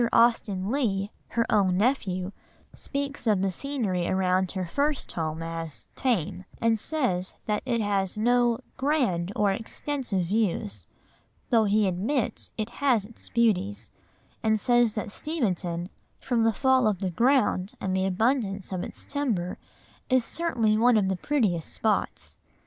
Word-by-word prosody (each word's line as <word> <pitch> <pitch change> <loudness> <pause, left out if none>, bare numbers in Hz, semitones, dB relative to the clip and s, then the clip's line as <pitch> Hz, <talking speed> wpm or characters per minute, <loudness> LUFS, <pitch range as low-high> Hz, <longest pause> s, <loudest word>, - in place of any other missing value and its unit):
Austen 215 -4 +3
Leigh, 210 -7 0 0.2
her 230 0 0
own 190 -4 +3
nephew, 195 -5 0 0.4
speaks 280 -2 -4
of 205 -3 +3
the 195 - +1
scenery 205 -7 -2
around 185 -1 +1
her 185 -2 -2
first 285 - -1
home 160 -1 -3
as 165 -2 -6
"tame," 210 - 0 0.2
and 225 -1 +2
says 195 - -1
that 210 -1 0
it 235 -2 +1
has 200 -2 0
no 240 +1 +3 0.2
"grand 250 - +1
or 205 -1 +3
extensive 225 0 -2
views," 170 - -1 0.6
though 225 -2 +5
he 210 +1 +3
admits 215 +8 -1
it 220 +1 -3
has 245 -8 +3
its 230 +2 -13
beauties, 205 -4 +1 0.5
and 220 -1 +2
says 240 0 +3
that 210 -1 -3
Steventon 185 - -2 0.3
"from 235 -3 +1
the 225 - +3
fall 260 +1 +3
of 210 -3 +1
the 190 -1 -2
ground, 230 - +2
and 185 -1 -1
the 190 0 +1
abundance 200 -1 0
of 185 -2 -2
its - - -9
timber, 225 -12 -2 0.5
is 255 -3 +3
certainly 240 -11 +1
one 240 0 +5
of 195 -3 +2
the 190 - +1
prettiest 195 - 0
spots." 220 -2 -2
210 Hz, 145 wpm, -27 LUFS, 185-245 Hz, 0.6 s, though